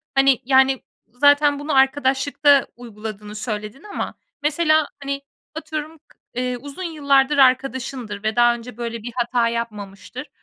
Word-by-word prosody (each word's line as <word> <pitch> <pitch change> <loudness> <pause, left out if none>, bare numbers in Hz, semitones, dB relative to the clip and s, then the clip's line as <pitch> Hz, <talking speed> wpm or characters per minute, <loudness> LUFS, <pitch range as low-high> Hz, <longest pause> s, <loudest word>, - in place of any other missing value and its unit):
hani, 270 -2 +4
yani, 265 0 +4 0.2
zaten 285 +3 +3
bunu 295 0 -2
arkadaşlıkta 270 +1 +3
uyguladığını 215 -3 -8
söyledin 215 +3 -5
ama 415 -1 -5 0.3
mesela, 310 0 +2 0.2
hani, 275 0 -3 0.3
atıyorum 315 0 -5
k 310 - -28 0.2
ııı, 250 0 -1
uzun 285 +7 -8
yıllardır 285 -4 +2
arkadaşındır 260 -5 +1
ve 215 0 -1
daha 240 0 +5
önce 240 0 -10
böyle 230 -2 -5
bir 240 - -6
hata 240 -1 +1
yapmamıştır. 215 +2 -6
265 Hz, 130 wpm, -21 LUFS, 235-285 Hz, 0.3 s, daha